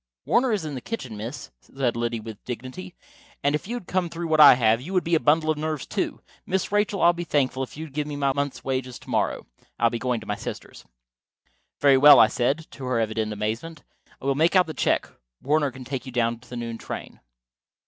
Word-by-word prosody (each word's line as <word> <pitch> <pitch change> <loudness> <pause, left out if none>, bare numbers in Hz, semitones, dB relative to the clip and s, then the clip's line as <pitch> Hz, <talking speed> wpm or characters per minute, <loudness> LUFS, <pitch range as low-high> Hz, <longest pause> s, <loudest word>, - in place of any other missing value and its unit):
"Warner 250 0 +2
is 200 -7 -1
in 150 - -5
the 130 - -5
kitchen, 130 - -6
miss," 105 +2 -7 0.2
Liddy 120 -3 -1
said 110 - -10
with 110 -2 -9
dignity. 130 +10 -7 0.5
"And 145 - +2
if 150 - -2
you 240 - -3
had 240 - -6
come 180 -1 -1
through 165 0 -5
what 155 -1 +2
I 145 -4 +10
have, 115 -1 +2
you 175 +9 -7
would 185 - +2
be 170 - -2
a 165 - +5
bundle 155 +1 +3
of 150 - -3
nerves, 155 -2 -3
too. - - -3 0.2
Miss 190 +1 -2
Rachel, 205 -1 +1
I'd 175 0 +6
be 175 - -4
thankful 135 -5 0
if 135 - -6
you'd 155 -3 -8
give 150 0 -2
me 145 - -5
my 140 -1 +1
month's 140 -2 -3
wages 130 -1 -3
to - - -12
morrow. - - 0 0.3
I'll 115 -1 +3
be 120 - -3
going 125 -2 -1
to - - -11
my - - -2
sister's." - - -8 0.9
"Very 140 -2 +5
well," 145 +2 +9
I 110 - +7
said, 135 +7 0
to 135 - -8
her 125 -2 0
evident 110 -1 -1
amazement. 115 +9 -4 0.4
"I - - -11
will 140 - +2
make 160 +6 +2
out 185 -1 +6
the 160 - -6
check. - - +1 0.3
Warner 145 +1 +1
can 130 0 -11
take 130 0 -5
you - - -6
down 115 -1 0
to 125 - -20
the 125 - -6
noon 115 -1 -5
train." - - -7
140 Hz, 235 wpm, -25 LUFS, 120-160 Hz, 0.9 s, I